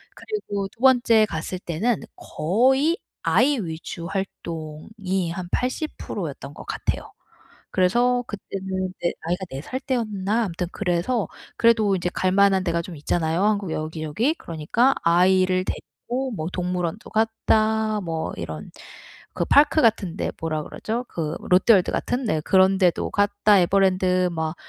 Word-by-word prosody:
그리고 205 - -4
2 220 - -27
번째 240 -4 +5
갔을 165 +3 -4
때는 190 +7 -1
거의 265 - +1 0.3
아이 285 +2 +3
위주 170 -1 -6
활동이 185 0 -4
한 185 -1 -5
80% 255 +5 -3
였던 - - -9
것 - - -11
같아요. - - -3 0.6
그래서 245 +7 +2
그때는 190 -2 -4
네 170 - 0
아이가 180 +4 -2
4 135 +1 -6
살 255 +10 -5
때였나? 220 -4 -1
아무튼 180 -2 -3
그래서 200 +4 0 0.3
그래도 220 -4 +4
이제 175 0 -1
갈 185 0 +1
만한 195 -1 +4
데가 170 -2 0
좀 175 -2 -8
있잖아요 160 +4 0
한국 205 -5 +1
여기저기. 155 - -1
그러니까 195 - +1
아이를 185 +2 +3
데리고 255 +6 -5
뭐 160 -7 -4
동물원도 180 +1 -3
갔다 220 -1 +1
뭐 165 -3 -3
이런 - - -6 0.6
그 - - -1
park 300 +2 +5
같은 200 -6 +2
데 - - -2
뭐라 155 -2 -2
그러죠? 235 +10 -4
그 160 -2 -3
롯데월드 185 +1 +4
같은. 250 +1 -1
네 160 -8 0
그런 190 +3 +4
데도 180 -3 +2
갔다 205 0 +3
에버랜드 185 0 +3
막 160 0 -3
190 Hz, 285 characters per minute, -23 LUFS, 170-220 Hz, 0.6 s, 번째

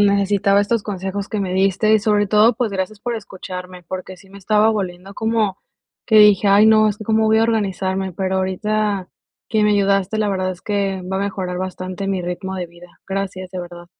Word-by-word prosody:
necesitaba 200 0 +3
estos 215 +1 0
consejos 195 0 -4
que 215 - -2
me 185 -2 -2
diste 195 +3 +2
y 220 - +5
sobre 210 -1 +1
todo, 215 +3 +4
pues 230 -2 -1
gracias 195 +2 -3
por 240 +1 -3
escucharme, 185 -3 -8
porque 185 +1 -7
sí 195 +2 -19
me 200 +1 -13
estaba 210 +3 +3
volviendo 190 -2 -4
como 220 -3 0 0.5
que 220 - +3
dije: 210 -1 +6
"Ay 205 +2 +6
no, 215 0 +5
¿es 210 0 -3
que 215 - -8
cómo 220 +1 +2
voy 220 0 +4
a 225 - +4
organizarme?", 190 -4 -1
pero 190 +1 -2
ahorita 200 +1 -1 0.4
que 215 -1 +1
me 210 - +3
ayudaste, 200 +1 +1
la 215 -1 +1
verdad 185 -1 -1
es 180 -1 -9
que 200 -3 -1
va 190 - -1
a 195 - -1
mejorar 185 -3 -3
bastante 185 +1 -5
mi 190 -2 -1
ritmo 185 +2 -4
de 180 -1 -4
vida. 170 +1 -16 0.2
Gracias, 190 -1 -4
de 185 -1 -5
verdad. 175 0 -10
195 Hz, 210 wpm, -20 LUFS, 185-210 Hz, 0.5 s, dije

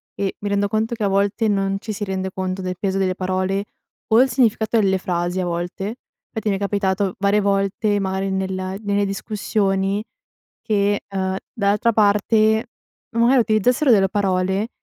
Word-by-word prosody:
e 195 -1 -2
mi 205 - -3
rendo 200 0 +1
conto 220 +3 -1
che 220 - -4
a - - +3
volte 200 +3 +1
non 195 -1 +1
ci 215 0 -5
si 205 - -5
rende 190 -1 -3
conto 185 0 -3
del 185 0 -3
peso 195 -1 -1
delle 185 -1 +1
parole 185 +2 -1 0.5
o 235 - +7
il 265 - +3
significato 230 -2 +2
delle 190 -2 +2
frasi 175 0 -2
a 180 - 0
volte, 175 +6 -4 0.3
fatti 220 -2 -2
mi 195 - +1
è - - -2
capitato 200 -1 0
varie 200 +1 +3
volte, 200 +1 +1
magari, 190 0 -2
nella 190 0 -2
nelle 205 -1 0
discussioni 195 0 -1 0.6
che, 205 -2 +1
uhm, 190 -1 -1 0.2
dall'altra 210 +1 +1
parte 215 +1 +3 0.5
magari 240 +3 +4
utilizzassero 235 +5 +2
delle 195 -3 +4
parole, 190 +1 0
200 Hz, 165 wpm, -21 LUFS, 190-215 Hz, 0.6 s, o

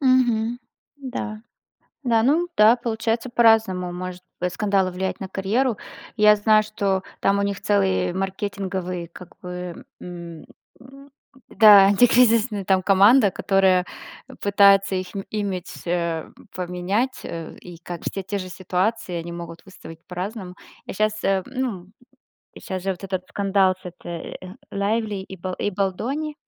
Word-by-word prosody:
Мгм. 245 -3 +2 0.4
Да. 245 -6 -6 0.6
Да, 230 -3 +2
ну 320 +7 +2
да. 215 +3 +7
Получается 230 0 -2
по-разному 220 -7 +3
может 180 0 -6 0.2
бы 180 +1 0
скандалы 195 0 0
влиять 190 +1 -3
на 195 - -5
карьеру. 210 +6 0 0.4
Я 210 0 +6
знаю, 215 +1 +4
что 200 -3 -1 0.2
там 200 0 +2
у - - +1
них 200 -1 -2
целый 95 - +1
маркетинговый, 190 -2 -4
как 175 +1 -13
бы, 180 -1 -7
м. 170 -2 -9 1.0
Да. 205 -3 +8
Антикризисная, 230 0 +4
там, 190 0 +3
команда, 200 +4 +6
которая 190 -1 +2 0.6
пытается 200 -1 +4
их 185 0 -3 0.2
имидж, 195 -4 -4
э, 170 -2 -1 0.3
поменять, 185 +8 -2
э, 165 -1 -7
и 175 -1 -11
как 175 -1 -8
все 195 - -4
те 200 +2 -3
же 185 -1 -6
ситуации, 185 +3 -2
они 170 0 -5
могут 170 -1 -8
выставить 165 -4 -13
по-разному. 185 +1 -6 0.3
Я - - -6
щас, 215 +1 -1
э, 195 -1 +1
ну. 235 -9 -4 0.7
Щас 185 -1 -5
же 195 - -1
вот 190 +1 -5
этот 185 -1 -3
скандал 195 -2 +2
с 185 - -25
этой, 170 -1 -8
э, 185 0 -10 0.2
Лайвли 210 +1 -1
и 190 0 -10
ба 185 +1 -5
и 205 - -1
Бальдони. 240 +11 -2
195 Hz, 140 wpm, -23 LUFS, 180-215 Hz, 1.0 s, Да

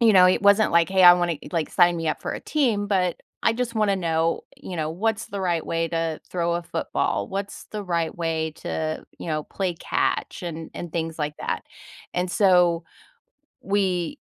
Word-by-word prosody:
you 225 -2 +6
know, 185 -1 +8
it 185 +2 +3
wasn't 200 +2 +5
like, 170 -1 +4
"Hey, 190 -1 +4
I 175 0 +11
wanna 175 -2 0
e" - - -10
like, 165 -3 -1
"Sign 175 -1 +4
me 165 -1 -2
up - - -2
for - - -3
a - - -4
team," 230 -9 +1
but 185 -3 +1 0.2
"I 225 - +3
just 240 -1 -2
wanna 210 -3 +2
know," 165 -2 0
you 180 - -7
know, 155 -1 -1
"what's 220 +5 -1
the 200 -1 -5
right 175 -3 0
way 165 0 -1
to 165 -1 -2
throw 170 -1 0
a 175 - -4
football? 170 - -1
What's 195 +1 -5
the 210 -1 -5
right 170 -3 -1
way 160 -2 -1
to, 155 0 -3
you - - -7
know, 155 -1 -1
play 190 -3 -2
catch" 165 - -1
and 165 -2 -6
and 170 -2 -6
things 165 -1 -3
like 150 0 -2
that? - - -3 0.5
And 180 0 0
so, 180 -4 +4 0.8
we, 195 - 0
175 Hz, 200 wpm, -24 LUFS, 165-195 Hz, 0.8 s, I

